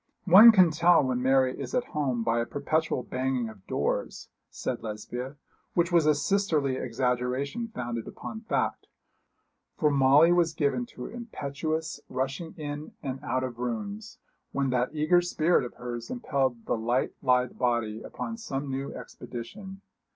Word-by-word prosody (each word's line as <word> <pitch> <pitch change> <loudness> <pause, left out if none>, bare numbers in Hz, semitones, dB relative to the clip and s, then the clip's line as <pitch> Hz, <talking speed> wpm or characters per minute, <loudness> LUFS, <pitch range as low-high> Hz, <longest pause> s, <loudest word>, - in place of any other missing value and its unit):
'One 205 +6 +10
can 185 -6 +6
tell 170 0 +5
when 125 -1 -1
Mary 130 0 +3
is - - -4
at 250 - +2
home 130 -6 0
by 115 +1 +1
a - - -1
perpetual 145 -2 -1
banging 130 -2 -1
of 100 -4 -15
doors,' - - -2 0.2
said 125 - -4
Lesbia, 120 +5 -6 0.4
which 170 0 +2
was 170 -3 +4
a 150 - +5
sisterly 155 -6 +1
exaggeration 125 - -1
founded 120 - -5
upon 220 - -7
fact, 225 - -1 0.9
for 150 -2 +3
Molly 140 +4 +6
was 170 -2 +2
given 155 +12 0
to - - -9
impetuous 160 -8 -4
rushing 135 +6 -3
in 150 0 -6
and 135 -1 -4
out 130 0 -1
of 120 -2 -5
rooms 200 - -4 0.3
when 140 -1 0
that 125 0 +1
eager 155 +3 +3
spirit 175 -3 +2
of 125 - -7
hers 120 -1 -6
impelled 135 - -1
the - - 0
light 120 +3 0
lithe 125 -2 +2
body 120 -3 0
upon 225 - -6
some 140 -11 -4
new 135 +1 -3
expedition. 190 - -8
140 Hz, 150 wpm, -28 LUFS, 125-170 Hz, 0.9 s, One